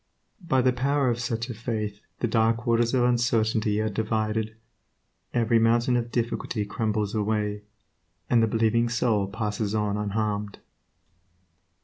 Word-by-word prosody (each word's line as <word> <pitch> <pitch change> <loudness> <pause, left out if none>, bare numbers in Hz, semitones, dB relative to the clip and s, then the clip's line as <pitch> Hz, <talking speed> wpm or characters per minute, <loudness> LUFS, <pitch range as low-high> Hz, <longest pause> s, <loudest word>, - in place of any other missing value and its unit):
By 130 -7 +2
the 130 0 +3
power 135 +1 +1
of 120 - -2
such 115 -1 -2
a 125 - -5
faith 110 -2 -4 0.2
the 120 - +2
dark 115 +1 +1
waters 120 +1 +2
of 125 - +3
uncertainty 115 -3 +2
are 110 - 0
divided, 110 0 -1 0.8
every 115 -1 +2
mountain 120 +2 +3
of 120 -1 -1
difficulty 115 -2 -2
crumbles 105 -1 -1
away, 105 -1 -1 0.7
and 120 -2 +4
the 115 - +3
believing 115 +1 +2
soul 115 -4 +1
passes 105 0 -2
on 105 -1 0
unharmed. 105 0 -2
110 Hz, 135 wpm, -26 LUFS, 105-120 Hz, 0.8 s, and